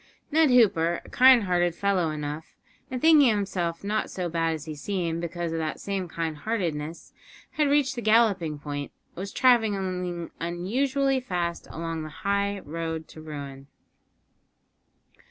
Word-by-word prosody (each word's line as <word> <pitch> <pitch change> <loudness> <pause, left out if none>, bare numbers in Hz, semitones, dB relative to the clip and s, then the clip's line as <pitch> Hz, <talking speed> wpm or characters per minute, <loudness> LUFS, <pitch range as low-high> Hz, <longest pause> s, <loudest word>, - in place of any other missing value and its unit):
Ned 315 0 +4
Hooper, 175 -9 +4
a - - -13
kind 255 -2 +6
hearted 175 -2 +1
fellow 190 -3 +1
enough, 150 +1 -5 0.3
and 255 - -3
thinking 305 -3 +6
himself 190 -5 -1
not 210 +2 -1
so 180 -2 -3
bad 165 -1 0
as 155 0 -8
he 155 - -5
seemed 170 +1 -2
because 170 0 -3
of 165 - -2
that 155 -1 -3
same 195 -2 -3
kind 160 -2 -3
heartedness, 165 -5 -3 0.4
had 300 -2 +1
reached 285 -2 +3
the 240 - -5
galloping 215 -9 +3
point, 145 -1 -5 0.2
and - - -35
was 195 +2 -5
travelling 190 -8 +1
unusually 260 +11 0
fast 175 -8 -3
along 165 0 -4
the 155 - -6 0.2
high 200 0 0
road 160 +1 -5
to 155 - -11
ruin. 140 -3 -8
175 Hz, 150 wpm, -26 LUFS, 160-215 Hz, 0.4 s, kind